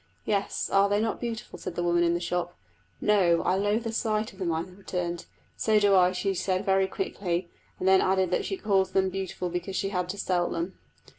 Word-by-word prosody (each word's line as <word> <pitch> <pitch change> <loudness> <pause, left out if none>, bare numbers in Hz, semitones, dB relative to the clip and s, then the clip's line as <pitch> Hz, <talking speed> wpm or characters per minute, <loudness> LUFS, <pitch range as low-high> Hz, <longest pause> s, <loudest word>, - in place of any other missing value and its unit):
"Yes, 200 -2 -1
are 195 0 +3
they 205 +1 +2
not 225 +1 -1
beautiful?" 230 -2 -5
said 180 - -6
the 175 - -1
woman 175 0 +2
in 170 0 +2
the - - 0
shop. 175 0 -3 0.4
"No, 185 -5 +3
I - - +2
loathe 205 +4 +1
the 225 - -3
sight 215 -1 -1
of 190 - -17
them," 180 -3 0
I 160 0 0
returned. 180 -1 -5 0.3
"So 215 -1 +3
do 205 -1 +4
I!" 180 -1 +5
she 190 +2 -1
said 185 +1 -1
very 195 -1 +3
quickly, 180 - -3 0.3
and 185 - -2
then 190 0 +6
added 190 -1 +2
that - - +1
she 390 - -3
called 195 - +1
them 190 -1 +2
beautiful 190 -1 -3
because 180 +2 -4
she 195 - 0
had 180 -2 -2
to 200 - -4
sell 180 -3 0
them. 170 +3 -3
190 Hz, 220 wpm, -27 LUFS, 180-200 Hz, 0.4 s, then